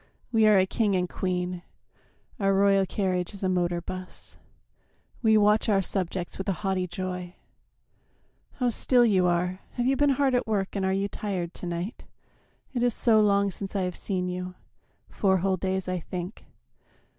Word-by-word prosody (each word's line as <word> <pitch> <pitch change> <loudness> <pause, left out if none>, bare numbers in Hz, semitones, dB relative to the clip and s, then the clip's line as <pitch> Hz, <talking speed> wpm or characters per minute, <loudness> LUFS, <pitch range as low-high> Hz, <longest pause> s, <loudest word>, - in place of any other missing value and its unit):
We 220 -2 +4
are 210 -2 +6
a 190 - +5
king 205 0 +1
and 180 -1 +1
queen, 180 -1 -2 0.8
Our 195 -1 +2
royal 195 -1 +4
carriage 185 -1 -1
is 200 - -8
a 190 - +2
motor 175 -1 0
bus, 185 +1 -7 0.9
We 220 -2 +5
watch 210 +2 +3
our 195 -2 +3
subjects 185 -1 -3
with 190 - -2
a - - +2
haughty 190 -1 0
joy.... 180 0 -5 1.2
How 250 -2 0
still 245 +1 +3
you 190 -5 +3
are! 180 +1 0
Have 245 - -1
you 270 +2 +3
been 290 +2 +3
hard 275 -2 +2
at 245 -1 +1
work 200 -3 -1
And 195 - -1
are 190 - +1
you 195 +1 0
tired 185 -5 -4
to 180 - -7
night? 175 +7 -4 0.7
It 245 - -1
is 245 -2 +2
so 220 -3 +4
long 200 -1 +3
Since 195 +2 -7
I 195 - +1
have 180 -1 -3
seen 185 -2 -2
you 180 0 -4 0.5
four 190 -2 +2
whole 190 +1 +1
days, 190 0 -2
I 185 0 -1
think. 180 +4 -7
190 Hz, 180 wpm, -27 LUFS, 180-210 Hz, 1.2 s, are